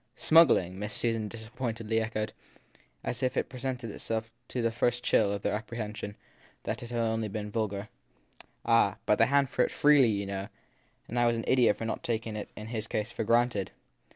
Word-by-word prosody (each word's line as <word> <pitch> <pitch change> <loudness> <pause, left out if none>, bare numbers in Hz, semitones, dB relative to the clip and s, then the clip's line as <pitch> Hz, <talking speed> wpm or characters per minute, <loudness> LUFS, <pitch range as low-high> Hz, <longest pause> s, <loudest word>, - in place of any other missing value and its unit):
Smuggling? 95 - +5
Miss 105 0 -3
Susan 115 -2 0
disappointedly 115 0 -3
echoed 110 -1 -3 0.7
as 120 - -3
if 130 -1 0
it - - 0
presented 125 -3 -4
itself 115 +2 -4 0.2
to 125 - -4
the 115 - +2
first 120 +1 0
chill 100 -2 +3
of 100 -1 -3
their - - 0
apprehension 105 -1 -5 0.5
that 110 +2 -3
he 120 - -7
had, 120 - -6
then, 115 -1 +1
only 110 0 -1
been 105 0 -5
vulgar. 105 -2 -2 0.5
i - - -25 0.2
Ah, 115 -4 +4
but 105 - +3
they 115 - +6
hanged 140 -1 +3
for - - +1
it - - 0
freely, 145 -5 +5
you 100 -2 -1
know, 100 0 -4 0.6
and 120 - -2
I 120 - +4
was 120 0 +2
an 115 - -4
idiot 125 -5 +4
for 115 - -4
not 115 - -1
having 115 -2 +1
taken 110 -1 -7
it, 105 - -5
in 105 - -7
his 110 -2 -3
case, 110 +1 -2
for 115 - -3
granted. 115 -3 +2
115 Hz, 210 wpm, -29 LUFS, 105-120 Hz, 0.7 s, they